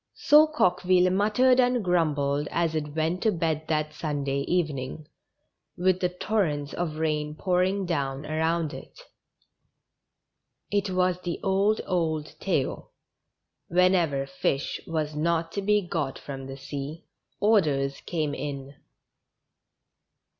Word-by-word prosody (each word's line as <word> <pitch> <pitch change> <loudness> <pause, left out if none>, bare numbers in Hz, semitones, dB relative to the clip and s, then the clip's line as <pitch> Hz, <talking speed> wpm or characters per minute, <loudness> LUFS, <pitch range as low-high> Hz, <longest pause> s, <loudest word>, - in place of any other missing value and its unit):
So 305 +1 +6
Coqueville 185 -9 +3
muttered 215 +7 +3
and 245 -2 +3
grumbled 150 -5 +1
as 170 -1 0
it 150 -1 -3
went 160 +3 0
to 220 - +3
bed 160 -3 -1
that 155 -1 -1
Sunday 145 -3 -2
evening, 155 -4 -2 0.7
with 185 +1 +2
the 180 - +1
torrents 180 -6 -1
of 170 -3 -3
rain 150 -1 -1
pour 180 +1 +1
ing 190 +1 0
down 140 -4 -2
around 160 +1 0
it. - - -11 1.7
It 205 -1 +1
was 180 -1 +1
the 175 -2 -3
old, 195 +2 +2
old 160 -5 -1
tale; 165 -9 -2 0.7
whenever 175 -6 +2
fish 135 0 -2
was 155 -2 -2
not 165 +1 0
to 200 - -3
be 210 +1 +2
got 160 -6 -3
from 135 -2 -7
the 135 0 -7
sea, 145 +3 -6 0.3
orders 150 -11 +2
came 155 -4 -1
in. 140 -1 -5
165 Hz, 125 wpm, -26 LUFS, 150-185 Hz, 1.7 s, So